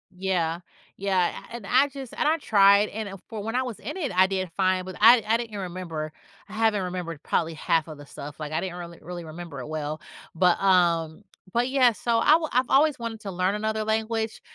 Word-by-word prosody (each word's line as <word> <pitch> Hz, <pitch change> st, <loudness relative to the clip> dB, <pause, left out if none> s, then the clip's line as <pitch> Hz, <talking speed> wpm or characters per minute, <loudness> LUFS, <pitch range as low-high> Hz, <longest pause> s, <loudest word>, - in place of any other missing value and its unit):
Yeah. 175 Hz, -3 st, -1 dB, 0.4 s
Yeah, 190 Hz, -3 st, +1 dB, 0.2 s
and 235 Hz, -4 st, -7 dB
I 260 Hz, +6 st, +4 dB
just 270 Hz, -3 st, -9 dB
and -, -, 0 dB
I 315 Hz, -, +4 dB
tried, 200 Hz, -3 st, +5 dB
and 200 Hz, -2 st, -6 dB
for 220 Hz, -3 st, -5 dB
when 225 Hz, +3 st, -4 dB
I 255 Hz, -, +2 dB
was 245 Hz, -4 st, -6 dB
in -, -, -6 dB
it, 300 Hz, -, -3 dB
I 185 Hz, +1 st, +5 dB
did 185 Hz, -3 st, -3 dB
fine, 185 Hz, -1 st, +2 dB
but 185 Hz, 0 st, -8 dB
I 230 Hz, +1 st, +7 dB
I 225 Hz, +2 st, +3 dB
didn't 225 Hz, -3 st, -6 dB
remember 175 Hz, -4 st, -5 dB, 0.4 s
I -, -, -11 dB
haven't 215 Hz, -3 st, +1 dB
remembered 175 Hz, -4 st, -5 dB
probably 165 Hz, -1 st, 0 dB
half 160 Hz, +1 st, 0 dB
of 155 Hz, -, -9 dB
the 145 Hz, -, -12 dB
stuff, 145 Hz, +1 st, -9 dB
like, 155 Hz, -1 st, -6 dB
I 155 Hz, -, 0 dB
didn't 185 Hz, -2 st, -4 dB
really 170 Hz, -1 st, -9 dB
really 175 Hz, 0 st, -7 dB
remember 160 Hz, -4 st, -8 dB
it -, -, -7 dB
well, 155 Hz, 0 st, -4 dB, 0.3 s
but, 180 Hz, +1 st, +3 dB
um, 175 Hz, -2 st, +2 dB, 0.3 s
but, 240 Hz, +2 st, +1 dB
yeah, 255 Hz, -3 st, +4 dB
so 230 Hz, +1 st, 0 dB
I 310 Hz, +7 st, +6 dB
I've 255 Hz, 0 st, +1 dB
always 290 Hz, -1 st, +4 dB
wanted 225 Hz, -2 st, -5 dB
to 195 Hz, -, -6 dB
learn 185 Hz, +3 st, 0 dB
another 215 Hz, 0 st, -2 dB
language, 220 Hz, 0 st, -1 dB
195 Hz, 215 wpm, -25 LUFS, 170-225 Hz, 0.4 s, I